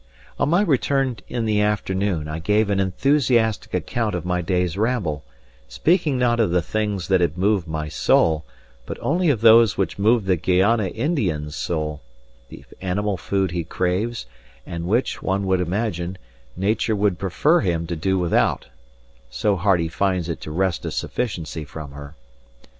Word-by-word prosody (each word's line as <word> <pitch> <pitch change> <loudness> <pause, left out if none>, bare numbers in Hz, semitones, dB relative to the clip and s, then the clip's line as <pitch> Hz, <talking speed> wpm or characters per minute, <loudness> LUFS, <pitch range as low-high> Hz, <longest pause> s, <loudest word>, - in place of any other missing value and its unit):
On - - +2
my 175 +5 +4
return 135 - +1
in 120 -2 -2
the 105 -1 +2
afternoon 95 -5 -1
I 75 +1 -4
gave 105 +4 +1
an 100 - +1
enthusiastic 115 +2 +1
account 115 -4 -1
of 90 - -4
my 90 0 0
day's 90 0 0
ramble, 100 - -1 0.4
speaking 150 - +1
not 120 -1 +2
of 110 - +3
the 85 -1 +1
things 105 -2 -2
that 95 -2 +3
had 85 -1 0
moved 95 -2 +1
my 80 -1 -3
soul, 80 +1 +2 0.4
but - - -5
only 170 +3 +1
of 120 -7 +1
those 115 -1 +6
which 95 0 -2
move 110 +1 +3
the 95 -2 +2
Guayana 95 +5 +2
Indian's 90 - -2
soul 75 -4 -3 0.5
the - - -12 0.2
animal 100 +2 -1
food 95 0 -1
he 85 -1 -2
craves, 90 - -2 0.4
and 85 -1 -5
which, 115 +7 0
one 95 +1 -1
would 95 -1 +1
imagine, 90 -1 -2 0.4
Nature 105 +3 0
would 100 -3 +1
prefer 100 - +2
him 85 -5 -1
to 85 +1 -4
do 95 +4 0
without, 90 -2 +1 0.6
so - - 0
hard 95 0 +2
he 85 - 0
finds 90 +2 -1
it 85 - -4
to - - -7
wrest 90 +2 -1
a - - -3
sufficiency 85 -8 -3
from 75 0 -9
her. 70 +1 -10
95 Hz, 165 wpm, -22 LUFS, 85-110 Hz, 0.6 s, those